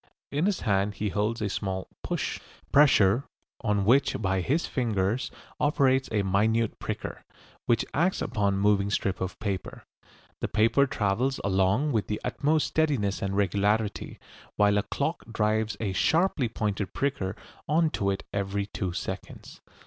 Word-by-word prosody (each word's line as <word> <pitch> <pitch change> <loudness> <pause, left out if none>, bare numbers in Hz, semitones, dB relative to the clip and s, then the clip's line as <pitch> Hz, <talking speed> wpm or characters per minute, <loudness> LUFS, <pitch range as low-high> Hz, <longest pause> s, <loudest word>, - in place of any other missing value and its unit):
In 150 +6 +1
his 205 -3 0
hand 100 -1 +1
he 105 0 -2
holds 105 +3 -1
a - - +1
small 95 -1 -3
"push," - - -3 0.3
pressure 130 -5 +5 0.4
on 105 -3 +1
which 135 +5 +3
by 95 -2 0
his 150 - 0
fingers 115 -2 -1 0.3
operates 135 -3 +2
a 105 -2 +1
minute 110 +4 +1
pricker, - - -5 0.4
which 115 -1 +2
acts 175 +5 +1
upon 100 -2 0
a - - -1
moving 100 0 +2
strip 100 -2 -1
of 95 0 -3
paper. 100 -4 -4 0.6
The - - -1
paper 115 +6 +3
travels 120 +5 0
along 100 +9 +2
with 110 -5 0
the 105 - -2
utmost 150 0 +1
steadiness 140 -12 0
and 100 0 -2
regularity, 100 +2 0 0.4
while 105 0 +4
a - - +2
clock 155 +4 -2
drives 110 -1 0
a 100 -4 -2
sharply 160 - +2
pointed 105 -3 -2
pricker 135 -10 -1 0.3
on 160 +1 +3
to 100 - 0
it 95 - -2
every 100 0 -1
two 95 -3 -4
seconds. - - -7
105 Hz, 150 wpm, -27 LUFS, 100-130 Hz, 0.6 s, pressure